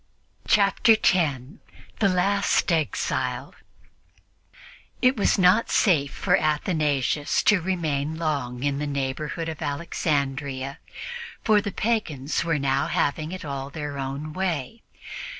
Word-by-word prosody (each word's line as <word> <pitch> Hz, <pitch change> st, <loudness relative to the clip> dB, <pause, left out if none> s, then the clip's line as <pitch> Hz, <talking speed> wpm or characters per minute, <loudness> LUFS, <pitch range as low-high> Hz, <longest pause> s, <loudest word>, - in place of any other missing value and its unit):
Chapter 205 Hz, +2 st, +5 dB
10 150 Hz, -, 0 dB, 0.4 s
THE 200 Hz, -, +4 dB
LAST 195 Hz, +1 st, +2 dB
EXILE 160 Hz, -3 st, -1 dB, 1.5 s
IT 255 Hz, +1 st, +4 dB
was 205 Hz, -, +2 dB
not 190 Hz, +4 st, +4 dB
safe 150 Hz, -8 st, +3 dB
for -, -, +1 dB
Athanasius 150 Hz, -2 st, 0 dB
to 205 Hz, -4 st, +4 dB
remain 160 Hz, -4 st, -1 dB
long 140 Hz, -6 st, -2 dB
in 140 Hz, -1 st, 0 dB
the 150 Hz, -, -2 dB
neighborhood 140 Hz, +4 st, -3 dB
of 160 Hz, -2 st, -6 dB
Alexandria, 140 Hz, -2 st, -2 dB, 0.6 s
for 215 Hz, -2 st, +4 dB
the 200 Hz, -, -4 dB
pagans 170 Hz, -, -1 dB
were 165 Hz, -2 st, 0 dB
now 135 Hz, -1 st, +1 dB
having 155 Hz, +3 st, -1 dB
it 185 Hz, -3 st, -6 dB
all 140 Hz, -1 st, -4 dB
their 145 Hz, -1 st, -5 dB
own 140 Hz, +3 st, -4 dB
way. 185 Hz, -, -3 dB
155 Hz, 115 wpm, -25 LUFS, 140-185 Hz, 1.5 s, Chapter